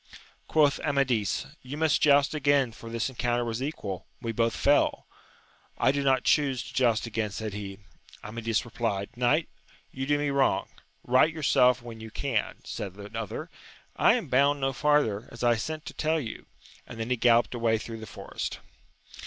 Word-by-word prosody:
Quoth 145 -3 +3
Amadis, 130 -8 0 0.2
You 135 +3 -7
must 160 -2 +2
joust 145 0 +5
again, 140 -4 +2
for 115 0 -11
this 115 -1 -1
en 130 - -8
counter 120 -1 0
was 115 +1 -3
equal, 105 - -4
we 115 - -3
both 115 0 0
^fell. 145 +1 +3 0.7
I - - +4
do 140 +1 -1
not 135 -2 +2
chuse 135 -5 +2
to - - -11
joust 120 -4 +2
again, 115 -2 -2
said 105 +1 -5
he. 100 -1 -6 0.5
Amadis 115 +1 -2
replied, 115 -2 -3
Knight, 125 +7 +2 0.4
you 135 0 -4
do 145 0 +3
me 145 -1 0
wrong. 140 -1 +2 0.4
Eight 130 +6 +5
yourself 125 -5 +3
when 115 -2 -9
you 110 0 -8
can! 120 0 -2
said 95 -2 -6
the 105 +2 -10
other: 115 -3 -5 0.4
I - - +5
am - - -3
bound 140 +3 +3
no 135 0 0
farther, 135 -7 +1
as 120 - -8
I 120 -1 +4
sent 155 +7 -4
to - - -7
tell 160 +1 0
you! 120 -7 -7 0.4
and 115 - -9
then 115 +2 -3
he - - +4
galloped 120 0 +3
away 115 -2 +1
through 115 +1 -7
the 110 - -9
forest. - - -5
120 Hz, 180 wpm, -28 LUFS, 115-140 Hz, 0.7 s, joust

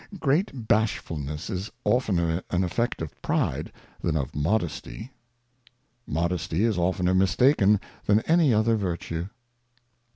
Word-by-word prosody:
GREAT 140 - 0
Bashfulness 80 -9 -1
is 95 +2 -3 0.2
oftener 90 -9 +1
an 90 +1 +1
Effect 105 +1 -1
of 80 - -6
Pride - - -1 0.3
than 80 -2 0
of 70 -4 -2
Bashfal 75 - -4
Modesty. 110 - -2 1.0
Modesty 85 +3 -1
is 115 -2 +2
oftner 90 +1 +1
mistaken 105 +1 +4 0.3
than 105 +1 +4
any 165 -1 +3
other 110 +1 +3
Virtue. 85 -3 -3
95 Hz, 120 wpm, -26 LUFS, 85-110 Hz, 1.0 s, mistaken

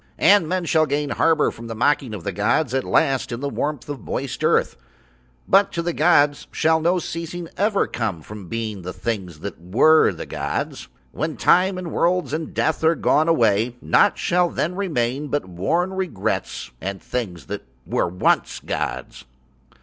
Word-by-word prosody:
And 190 -2 +5
men 185 -1 -1
shall 160 -1 +3
gain 145 0 -1
harbour 165 -2 +2
from 115 - -10
the 115 - -5
mocking 125 -1 +1
of 95 - -8
the 100 - -2
gods 110 - 0
at 135 -1 +1
last 135 -6 +1
in 120 - -4
the 140 - -2
warm 145 0 -2 0.2
moist - - -4
earth, - - +2 0.7
but 195 +1 +4
to 170 - -2
the 175 0 -1
gods 145 -3 +3
shall 160 0 +2
no 175 +3 +2
ceasing 170 0 -5
ever 205 +1 +2
come 100 -9 -3
from 105 -1 -10
being 110 -1 -4
the 90 +1 -6
Things 95 -9 -4
that - - -7
were 125 - +4
the - - -7
gods. - - -4 0.2
When 155 0 -3
Time 185 +1 +3
and 180 -3 -5
worlds 180 -1 +1
and 160 0 -3
death 160 - 0
are 160 +1 +4
gone 155 0 +2
away 115 -6 +2
nought 200 - +3
shall 180 0 +2
then 170 +2 -2
remain 145 -7 -1
but 145 0 -1
worn 165 - -1
regrets 180 - -3
and 95 +1 -4
Things 95 -9 -5
that - - -5 0.2
were - - 0
once 90 +1 +1
gods. - - -4
150 Hz, 170 wpm, -22 LUFS, 110-170 Hz, 0.7 s, And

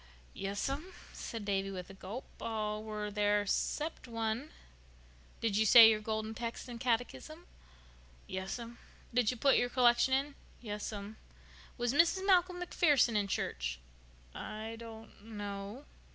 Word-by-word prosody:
"Yes'm," 270 - -3 0.2
said 225 -3 -6
Davy 195 -1 0
with 185 -1 -6
a - - -11
gulp. 195 +6 -7 0.2
"All 215 -1 -2
were 210 -1 -4
there—'cept 210 +9 0
one." 230 +4 -2 0.9
"Did 225 -3 +1
you 220 - +4
say 225 +1 +10
your 215 -1 0
Golden 220 0 -2
Text 230 +2 -5
and 240 -1 -7
catechism?" 250 +8 -2 0.8
"Yes'm." 230 +6 -5 0.3
"Did 240 -3 +3
you 250 - -2
put 275 +3 +4
your 245 - +2
collection 245 0 +4
in?" 280 +2 -1 0.3
"Yes'm." 210 -1 -5 0.6
"Was 240 0 0
Mrs. 340 +5 +3
Malcolm 365 -2 +4
MacPherson 295 -9 +3
in 205 -1 +2
church?" - - -2 0.6
"I 215 +1 -6
don't 225 -2 -11
know." 205 +3 -6
225 Hz, 130 wpm, -33 LUFS, 205-250 Hz, 0.9 s, say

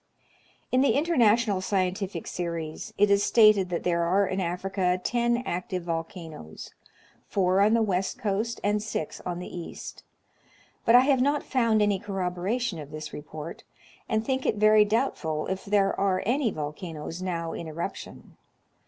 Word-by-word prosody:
In 255 - +4
the 280 - +4
International 235 - +3
Scientific 190 -1 -1
Series 170 -3 -4
it 205 0 +4
is 200 0 +4
stated 215 -5 +5
that 175 - -2
there 170 -1 +1
are 185 +4 +3
in 190 0 -2
Africa 180 +1 0
ten 240 0 +1
active 180 0 -3
volcanoes, 165 - -6 0.3
— - - -29 0.2
four 190 0 +2
on 215 +3 +5
the 230 - +3
west 190 -2 -1
coast, 215 +3 -2
and 205 +1 +1
six 210 -7 -4
on 175 -1 -2
the 180 - -7
east, 175 -1 -8 0.4
— - - -32
but 230 - +6
I 245 - +9
have 265 -1 +3
not 285 +2 +1
found 230 -5 +2
any 205 -2 +1
corroboration 195 +2 -2
of 145 -2 -8
this 155 0 -7
report, 155 +2 -8 0.5
and 220 0 0
think 265 -1 -1
it - - +1
very 215 0 +5
doubtful 190 - -1
if 190 0 -4
there 200 -1 +2
are 190 -1 +1
any 250 +2 +2
volcanoes 155 +1 -6
now 170 -3 -3
in 170 - -6
eruption. 170 +5 -7
195 Hz, 160 wpm, -27 LUFS, 175-220 Hz, 0.5 s, I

